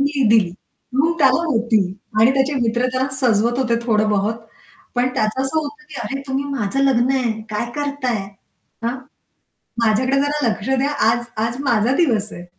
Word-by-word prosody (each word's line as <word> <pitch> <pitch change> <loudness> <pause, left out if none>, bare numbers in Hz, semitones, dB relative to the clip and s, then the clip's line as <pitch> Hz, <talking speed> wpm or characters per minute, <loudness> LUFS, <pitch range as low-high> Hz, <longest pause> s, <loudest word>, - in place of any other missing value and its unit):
मी 280 0 +1
दिली. 215 -5 +4 0.4
मग 315 +5 +3
त्याला 280 +3 +4
होती 230 -6 +2 0.4
आणि 230 +4 +6
त्याचे 270 +2 +1
मित्र 235 +2 +1
त्यांना 260 +1 0
सजवत 240 -1 +2
होते 240 -3 +1
थोडं 215 -2 +2
बहोत. 210 +2 +1 0.6
पण 245 +1 +2
त्याचं 215 +5 0
असं 270 +4 0
होतं 295 0 -5
की 305 - -12
अरे 275 +2 -4
"तुम्ही 270 +1 -1
माझं 275 -2 -2
लग्न 255 -2 +3
आहे, 255 -4 +1 0.2
काय 225 +3 -2
करताय? 285 -4 -1 0.7
हां? 235 +2 -1 0.9
माझ्याकडे 255 +5 +2
जरा 290 -1 0
लक्ष 215 +1 -3
द्या, 265 +2 +1 0.2
आज 235 +1 +2 0.2
आज 230 +1 -4
माझा 240 -1 +2
दिवस 225 - +1
आहे." 175 - -9
255 Hz, 165 wpm, -20 LUFS, 225-275 Hz, 0.9 s, आणि